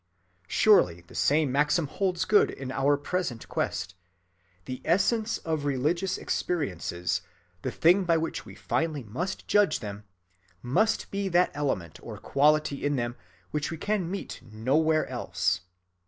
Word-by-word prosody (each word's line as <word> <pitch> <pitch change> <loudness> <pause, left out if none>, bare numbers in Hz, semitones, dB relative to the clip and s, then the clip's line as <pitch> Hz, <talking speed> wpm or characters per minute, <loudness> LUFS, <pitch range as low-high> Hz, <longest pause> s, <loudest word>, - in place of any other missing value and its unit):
Surely 90 - +4
the 85 - -18
same 145 -1 +2
maxim 145 +3 +2
holds 180 +4 -1
good 205 +1 +5
in 130 -1 -6
our 140 +2 +2
present 145 -5 -3
quest. - - -2 0.7
The 130 0 -6
essence 215 +6 +2
of 160 -3 -2
religious 150 +7 0
experiences, 90 - -2 0.4
the - - -2
thing 180 +4 +4
by 165 -1 +3
which 160 0 -3
we - - -12
finally 155 -4 -1
must 165 - -4
judge 205 -1 +3
them, 105 -1 -7 0.6
must 215 - +1
be 200 -1 -1
that 180 0 +3
element 135 - -2
or - - -8
quality 150 0 +2
in 145 0 +1
them 120 -1 -2 0.4
which 150 0 -1
we 165 - -5
can 205 0 -1
meet 195 +2 -5
nowhere 140 +9 +1
else. 100 -6 -1
150 Hz, 140 wpm, -28 LUFS, 125-180 Hz, 0.7 s, good